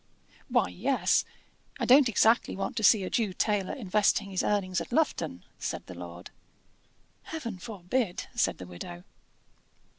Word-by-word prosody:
"Why, -, -, +2 dB
yes: -, -, +1 dB, 0.5 s
I -, -, 0 dB
don't 260 Hz, 0 st, +7 dB
exactly 225 Hz, +2 st, +3 dB
want 195 Hz, -, -3 dB
to 220 Hz, -, -1 dB
see 205 Hz, -1 st, +6 dB
a 185 Hz, -, -3 dB
Jew 215 Hz, -5 st, 0 dB
tailor 205 Hz, -1 st, 0 dB
investing 205 Hz, -2 st, +1 dB
his 185 Hz, -, 0 dB
earnings 185 Hz, -4 st, 0 dB
at 170 Hz, -, -8 dB
Lufton," 240 Hz, -, 0 dB, 0.2 s
said -, -, -4 dB
the -, -, -9 dB
lord. 85 Hz, 0 st, -9 dB, 0.9 s
"Heaven 235 Hz, -12 st, -5 dB
forbid!" 200 Hz, +2 st, -2 dB
said 240 Hz, -, +1 dB
the 90 Hz, -, -8 dB
widow. 85 Hz, 0 st, -9 dB
200 Hz, 145 wpm, -29 LUFS, 175-230 Hz, 0.9 s, don't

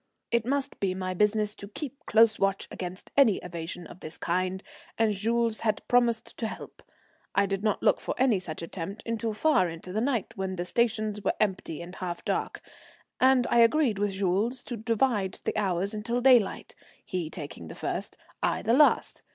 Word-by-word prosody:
It 235 Hz, 0 st, +1 dB
must 275 Hz, +1 st, -1 dB
be 190 Hz, -2 st, 0 dB
my 185 Hz, -1 st, -3 dB
business 210 Hz, +2 st, +2 dB
to 200 Hz, -, -10 dB
keep 280 Hz, +7 st, -7 dB
close 220 Hz, 0 st, +5 dB
watch 195 Hz, 0 st, 0 dB
against 185 Hz, +1 st, -7 dB
any 260 Hz, -8 st, +6 dB
evasion 170 Hz, 0 st, -6 dB
of 170 Hz, -, -12 dB
this 155 Hz, -2 st, -7 dB
kind, 185 Hz, +2 st, -1 dB, 0.3 s
and 225 Hz, -2 st, +3 dB
Jules 230 Hz, +2 st, 0 dB
had 215 Hz, -2 st, -1 dB
promised 240 Hz, -2 st, +2 dB
to 225 Hz, -, -1 dB
help. -, -, -9 dB, 0.5 s
I -, -, +4 dB
did 195 Hz, 0 st, -2 dB
not 215 Hz, -2 st, 0 dB
look -, -, +4 dB
for -, -, -4 dB
any 250 Hz, -6 st, +3 dB
such 170 Hz, -2 st, -6 dB
attempt 185 Hz, +4 st, -6 dB
until 230 Hz, -1 st, -2 dB
far 215 Hz, -, +3 dB
into 165 Hz, +2 st, -8 dB
the 215 Hz, -, 0 dB
night, 245 Hz, -6 st, -1 dB
when 190 Hz, -2 st, -3 dB
the 175 Hz, -1 st, -3 dB
stations 215 Hz, -1 st, 0 dB
were -, -, +1 dB
empty 185 Hz, -6 st, -1 dB
and 180 Hz, +2 st, -10 dB
half 175 Hz, -2 st, -5 dB
dark, -, -, -2 dB, 0.6 s
and 260 Hz, -1 st, +5 dB
I 240 Hz, -, +5 dB
agreed 235 Hz, -2 st, +4 dB
with 205 Hz, -1 st, 0 dB
Jules 200 Hz, +6 st, 0 dB
to 245 Hz, -, -5 dB
divide 225 Hz, -3 st, 0 dB
the -, -, -2 dB
hours 195 Hz, -1 st, 0 dB
till 235 Hz, +2 st, 0 dB
daylight, 245 Hz, -5 st, +3 dB, 0.3 s
he 175 Hz, -4 st, -3 dB
taking 145 Hz, -, -7 dB
the 80 Hz, -, -9 dB
first, -, -, -4 dB, 0.2 s
I -, -, 0 dB
the 225 Hz, -, +2 dB
last. 295 Hz, +3 st, +4 dB
210 Hz, 185 wpm, -28 LUFS, 185-235 Hz, 0.6 s, any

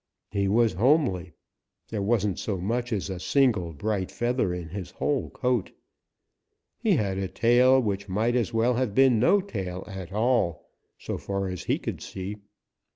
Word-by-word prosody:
He 100 Hz, -1 st, 0 dB
was 115 Hz, +3 st, +3 dB
homely. 100 Hz, -, +2 dB, 0.6 s
There 105 Hz, -3 st, -2 dB
wasn't 105 Hz, -3 st, +1 dB
so 100 Hz, -3 st, -2 dB
much 120 Hz, +7 st, -2 dB
as 100 Hz, -4 st, -1 dB
a 95 Hz, -2 st, -5 dB
single 110 Hz, -8 st, +2 dB
bright 95 Hz, +4 st, -2 dB
feather 120 Hz, -5 st, 0 dB
in 90 Hz, -2 st, -5 dB
his 95 Hz, +1 st, -6 dB
whole 145 Hz, -3 st, -1 dB
coat. 125 Hz, -6 st, -1 dB, 1.1 s
He -, -, +2 dB
had 95 Hz, -2 st, -1 dB
a 95 Hz, -, -1 dB
tail 125 Hz, +6 st, +4 dB
which 100 Hz, -4 st, -2 dB
might 110 Hz, +6 st, +1 dB
as 120 Hz, -2 st, +1 dB
well 115 Hz, +2 st, +2 dB
have 120 Hz, -4 st, -1 dB
been 130 Hz, -4 st, +5 dB
no 195 Hz, -, +4 dB
tail 95 Hz, -, -5 dB
at 95 Hz, -2 st, -7 dB
all, 110 Hz, -6 st, 0 dB, 0.3 s
so -, -, -5 dB
far 100 Hz, -1 st, -2 dB
as 90 Hz, -1 st, -6 dB
he -, -, +1 dB
could -, -, -5 dB
see. 95 Hz, +2 st, -6 dB
105 Hz, 165 wpm, -26 LUFS, 95-120 Hz, 1.1 s, been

